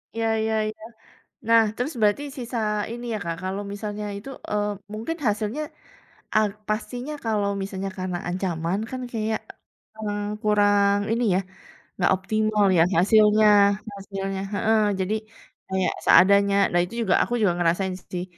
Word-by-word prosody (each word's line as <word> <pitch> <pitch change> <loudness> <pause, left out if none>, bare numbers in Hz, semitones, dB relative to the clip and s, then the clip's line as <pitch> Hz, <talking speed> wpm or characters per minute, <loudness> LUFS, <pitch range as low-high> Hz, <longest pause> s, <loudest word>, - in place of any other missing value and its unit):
Iya 225 0 0
iya 220 0 0
iya. 215 0 -8 0.7
Nah, 230 0 +7 0.2
terus 255 +6 -2
berarti 210 +5 +3 0.2
sisa 245 0 -5 0.4
ini 240 +1 -7
ya, - - -2
Kak. 170 -1 -3
Kalau 190 +2 -3
misalnya 210 0 -5
itu 200 +6 -9 0.2
eee, 210 0 0 0.2
mungkin 225 +10 -4
hasilnya 215 +6 -1 0.7
a - - +6 0.3
pastinya 245 +6 -3
kalau 210 -3 0
misalnya 195 0 -4
karena 185 -1 -2
ancaman 175 -1 -2
kan 260 - -5
kayak, 220 -1 -1 0.6
mmm, 205 -1 -3 0.2
kurang 205 -1 +3
ini 235 +2 +1
ya, - - +2 0.5
enggak 175 - +1
optimal 215 +2 +1
ya - - +7 0.2
hasilnya 215 +3 +5 0.5
hasilnya 195 -1 -5
heeh, 220 +1 +2 0.2
jadi 190 +3 0 0.5
kayak 190 -1 0
seadanya. 200 +1 +6 0.2
Nah, 175 - +3
itu 180 - -9
juga, 190 -5 +2
aku 240 - -3
juga 185 -4 +3
ngerasain 175 +2 +1 0.2
sih. 180 -1 -2
205 Hz, 145 wpm, -24 LUFS, 190-220 Hz, 0.7 s, Nah